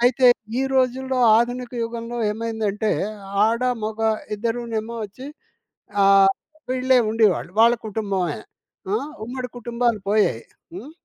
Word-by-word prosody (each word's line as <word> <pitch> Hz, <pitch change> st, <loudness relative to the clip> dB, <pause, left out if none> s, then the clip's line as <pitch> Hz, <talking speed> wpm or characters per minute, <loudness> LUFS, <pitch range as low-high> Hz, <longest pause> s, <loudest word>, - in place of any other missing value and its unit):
అయితే 250 Hz, +1 st, +4 dB, 0.3 s
ఈ -, -, +1 dB
రోజుల్లో 260 Hz, 0 st, +1 dB, 0.2 s
ఆధునిక 245 Hz, +1 st, -2 dB
యుగంలో 230 Hz, +1 st, -5 dB
ఏమైందంటే, 220 Hz, -1 st, -2 dB, 0.5 s
ఆడ, 230 Hz, +2 st, 0 dB, 0.2 s
మొగ 220 Hz, +1 st, -4 dB, 0.4 s
ఇద్దరూనేమో 230 Hz, 0 st, -3 dB
వచ్చి 215 Hz, +6 st, -10 dB, 0.8 s
ఆహ్, 195 Hz, 0 st, +6 dB, 0.4 s
వీళ్ళే 255 Hz, 0 st, +3 dB
ఉండేవాళ్ళు. 215 Hz, -6 st, +2 dB
వాళ్ళ 235 Hz, +1 st, +6 dB
కుటుంబమే. 195 Hz, -6 st, -2 dB, 0.6 s
ఆ! -, -, +3 dB, 0.3 s
ఉమ్మడి 250 Hz, +1 st, -5 dB
కుటుంబాలు 235 Hz, -1 st, -1 dB
పోయాయి. 205 Hz, -, +2 dB, 0.3 s
హ్మ్. 225 Hz, +11 st, -8 dB
230 Hz, 110 wpm, -22 LUFS, 210-245 Hz, 0.8 s, ఆహ్